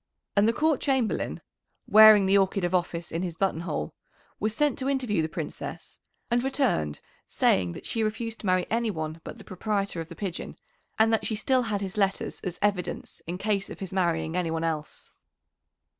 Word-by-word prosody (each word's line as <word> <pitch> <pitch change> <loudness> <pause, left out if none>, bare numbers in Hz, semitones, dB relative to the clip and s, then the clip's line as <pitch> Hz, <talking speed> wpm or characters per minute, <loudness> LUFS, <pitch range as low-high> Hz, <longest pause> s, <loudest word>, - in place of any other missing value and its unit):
And 200 +2 +5
the - - +5
Court 305 +3 +1
Chamberlain, 265 -6 0 0.4
wearing 215 -2 +8
the 195 +1 +4
orchid 195 -1 +2
of 175 +1 0
office 175 -2 -1
in 165 - -2
his 175 -3 -3
buttonhole, 165 - -2 0.5
was 215 +1 -1
sent 295 -1 +1
to 265 +1 -1
interview 250 -10 +1
the 160 - -2
Princess, - - -7 0.3
and 240 +1 +2
returned 260 - 0 0.3
saying 90 -2 +2
that - - -9
she 225 - -2
refused 225 +1 -2
to 205 - -5
marry 185 -1 +3
any 230 0 +1
one 160 -3 -4
but - - -8
the - - -11
proprietor 195 -2 -2
of 165 - -8
the 170 - -9
pigeon, 190 -3 -5 0.4
and 225 +1 +4
that 220 - +1
she 220 - -1
still 255 +4 +2
had 215 -4 -2
his 195 0 -5
letters 195 -1 0
as 180 -2 -4
evidence 200 -4 -2
in 175 +2 -3
case 200 0 -1
of - - -9
his 195 -2 -6
marrying 165 -3 0
anyone 165 -2 -1
else. 155 -2 -4
195 Hz, 190 wpm, -27 LUFS, 170-220 Hz, 0.5 s, wearing